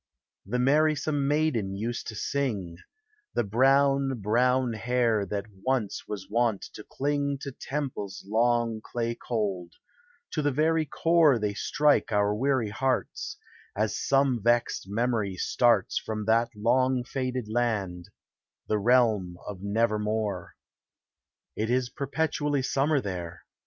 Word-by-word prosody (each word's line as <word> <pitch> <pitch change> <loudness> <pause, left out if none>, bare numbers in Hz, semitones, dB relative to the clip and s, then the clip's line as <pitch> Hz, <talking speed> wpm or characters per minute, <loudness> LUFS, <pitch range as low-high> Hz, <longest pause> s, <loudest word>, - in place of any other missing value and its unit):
The 120 +5 -1
merrvsome 145 +1 +2
maiden 140 -10 +1
used 115 +4 -4
to 110 - -6
sing 105 -10 -2 0.3
— 430 -1 -42
The - - +2
brown, 135 +3 +3
brown 125 +4 +2
hair 115 -2 +1
that 100 -1 -3 0.2
once 130 -6 -1
was 95 -3 -6
wont 115 -1 +1
to 110 - -9
cling 140 +2 -1
To 140 - -5
temples 130 -10 -5
long 115 0 +1
clay 115 -1 -2
cold: 100 -8 -3 0.6
to 155 - -1
the 145 - +2
very 155 +3 +1
core 165 -4 +4
They 105 -2 -1
strike 145 +7 +2
our 105 -1 +2
weary 130 0 +1
hearts, 130 +4 -2 0.4
As 105 +1 0
some 135 -4 +2
vexed 120 -3 +1
memory 110 -3 0
starts 115 +1 +2
From 110 -1 -4
that 115 +2 +3
long 125 +4 +2
faded 130 -2 -3
land 105 -7 -1 0.3
— - - -56
the 105 - +1
realm 110 -6 +2
of 100 -3 -7
Nevermore. 105 0 -1 1.0
It 110 +1 -2
is 125 0 +1
perpetual 145 0 -1
summer 140 +2 +1
there. 85 -4 -6
120 Hz, 130 wpm, -27 LUFS, 105-135 Hz, 1.0 s, core